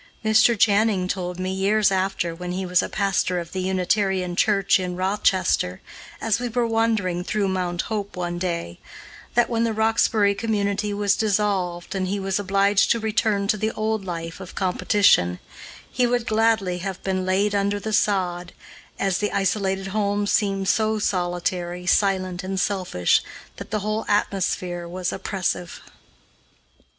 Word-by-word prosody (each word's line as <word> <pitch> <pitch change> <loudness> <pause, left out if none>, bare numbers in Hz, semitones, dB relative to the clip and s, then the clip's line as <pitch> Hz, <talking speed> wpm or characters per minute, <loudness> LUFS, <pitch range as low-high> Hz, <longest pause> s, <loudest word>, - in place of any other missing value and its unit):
Mr. 220 +2 +4
Channing 205 -2 +3
told 180 -1 -3
me, 185 0 -2
years 200 +2 +2
after, 190 -3 -1
when 180 +1 -5
he 190 +1 -3
was 180 -1 +2
pastor 195 -3 0
of 170 -1 -7
the 185 - -3
Unitarian 185 0 0
church 195 0 +3
in 180 -1 -3
Rochester, 185 - +1 0.4
as 225 -1 0
we 245 0 -3
were 240 +1 0
wandering 220 -6 0
through 205 +2 -1
Mount 180 -2 -1
Hope 205 -3 -4
one 175 -1 -3
day, 170 - -3 0.6
that, 240 -1 +4
when 230 -1 0
the 230 -1 0
Roxbury 220 -1 +2
community 205 -1 -1
was 205 -1 +1
dissolved 195 -5 -1
and 190 -1 -1
he 200 +2 -2
was 195 0 -1
obliged 200 0 +2
to 235 - +3
return 215 -2 0
to 215 - +3
the 215 +2 0
old 220 -1 -1
life 165 -2 -6
of 190 -2 -10
competition, 180 - +3 0.5
he 250 -1 +2
would 240 -1 0
gladly 220 -5 +1
have 190 0 -5
been 190 -1 -1
laid 195 +3 +1
under 200 0 0
the 220 +1 -4
sod, 180 -4 0 0.4
as 195 -2 0
the 210 - -1
isolated 195 0 0
home 205 0 0
seemed 195 -2 0
so 215 +3 +2
solitary, 175 -2 -2
silent, 185 -1 +1
and 190 0 -3
selfish 185 - +1 0.4
that - - -8
the 215 -1 -2
whole 215 +2 -2
atmosphere 180 -3 -1
was 180 +1 -3
oppressive. 180 -3 -3
195 Hz, 155 wpm, -23 LUFS, 180-210 Hz, 0.6 s, Mr